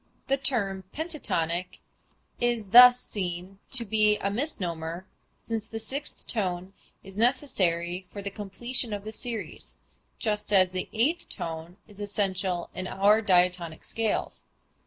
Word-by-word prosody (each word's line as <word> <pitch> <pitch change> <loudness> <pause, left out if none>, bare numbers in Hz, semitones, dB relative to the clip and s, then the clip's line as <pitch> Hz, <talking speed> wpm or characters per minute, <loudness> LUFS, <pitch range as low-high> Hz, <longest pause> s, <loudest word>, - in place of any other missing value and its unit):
The 275 - +1
term 200 -8 +2
pentatonic 185 - -1 0.6
is 240 -4 0
thus 245 +3 +9
seen 185 -2 -5
to 245 -3 0
be 215 0 +3
a 200 - -1
misnomer 180 - -3 0.3
since 225 -2 -4
the 225 - -6
sixth 270 +7 -3
tone 185 -3 -1 0.3
is 195 +1 -9
necessary 185 - +1
for 200 +2 -8
the 200 - -4
completion 220 +4 -3
of 200 -1 -4
the 215 - -6
series, 225 0 -6 0.4
just 210 -2 0
as 185 -2 +5
the 185 0 -4
eighth 300 +10 +1
tone 165 +2 -5
is 205 -1 -12
essential 190 -3 -1
in 185 - -4
our 205 +4 +3
diatonic 180 -4 +2
scales. 225 -2 -1
200 Hz, 135 wpm, -27 LUFS, 185-230 Hz, 0.6 s, thus